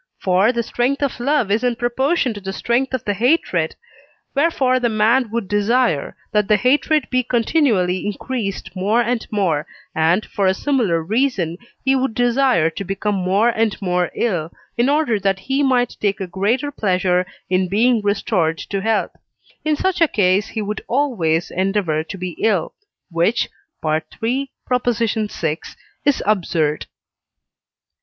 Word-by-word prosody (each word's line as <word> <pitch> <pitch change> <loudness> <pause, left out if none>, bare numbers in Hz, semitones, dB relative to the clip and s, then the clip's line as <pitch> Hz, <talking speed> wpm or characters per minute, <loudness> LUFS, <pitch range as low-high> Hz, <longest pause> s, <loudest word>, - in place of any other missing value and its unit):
For 190 +4 +3
the 235 -1 -1
strength 255 +5 -1
of 275 -3 -2
love 260 -4 +1
is 220 +4 +1
in 245 -1 +1
proportion 260 +3 0
to 205 - -8
the 195 0 -5
strength 240 +6 0
of 255 - -6
the 205 - +1
hatred, 250 - +1 0.6
wherefore 275 -4 +2
the 240 -1 +1
man 225 +3 +2
would 230 -2 -3
desire, 205 - +1 0.2
that 210 -2 +2
the 210 - +4
hatred 285 +6 +2
be 255 0 +3
continually 230 - +1
increased 205 -3 -4
more 200 +5 +1
and 240 0 -1
more, 180 -8 0 0.3
and, 165 +6 +2
for 200 -2 -1
a 190 - +3
similar 215 - +1
reason, 195 -5 0 0.3
he 270 0 +4
would 265 -3 -1
desire 245 -9 +3
to 200 - -5
become 195 +2 -2
more 195 +4 +2
and 225 -2 0
more 180 -2 0
ill, 175 -8 -1 0.2
in 240 +3 +2
order 285 -7 +2
that 195 -1 +1
he 265 +9 -1
might 255 -3 +2
take 205 0 0
a 190 - -2
greater 215 +10 -1
pleasure 185 -6 +1 0.2
in 185 0 +1
being 225 +5 +3
restored 200 -5 0
to 195 +3 -4
health: 220 +1 0 0.5
in 310 -1 +1
such 375 +3 -1
a 330 - +6
case 200 -3 +2
he 220 - -4
would 210 +1 -4
always 220 - 0
endeavour 185 -4 0
to 195 +5 -8
be 180 -1 -4
ill, 205 -7 +1 0.4
which 170 +8 +1 0.4
(III. 225 - -1 0.2
vi.) 220 -9 0 0.5
is 285 - +2
absurd. 170 -7 0
215 Hz, 155 wpm, -20 LUFS, 185-250 Hz, 0.6 s, a